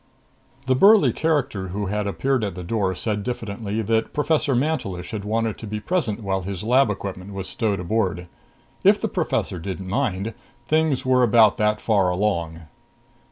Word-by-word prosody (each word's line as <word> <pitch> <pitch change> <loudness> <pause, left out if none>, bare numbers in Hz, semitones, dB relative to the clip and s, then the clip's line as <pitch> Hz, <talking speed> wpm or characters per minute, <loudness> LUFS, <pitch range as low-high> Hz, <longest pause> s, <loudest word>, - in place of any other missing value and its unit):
7 - - -28
The 130 - +2
burly 195 - +6
character 135 -11 0
who 100 +3 -3
had 105 +1 -2
appeared 130 +4 0
at 100 -4 -3
the 90 - -6
door 95 -1 -1
said 105 +2 -2
diffidently 110 -2 -3
that 110 +1 0
Professor 150 -2 +1
Mantelish 120 - -2
had 105 -2 -4
wanted 110 +1 -1
to 110 - -7
be 105 +1 -3
present 115 - -1
while 95 -1 -1
his 95 0 -5
lab 125 +2 +4
equipment 100 -1 -5
was 95 -1 -5
stowed 105 -4 -1
aboard. 90 -1 -1 0.6
If - - +5
the - - -1
professor 90 - -2
didn't 95 +2 -6
mind, 110 -2 -1 0.3
things 155 -2 +1
were 130 -1 +3
about 115 -3 +5
that 105 0 +1
far 100 -5 +2
along. 85 -4 -1
105 Hz, 170 wpm, -23 LUFS, 95-125 Hz, 0.6 s, burly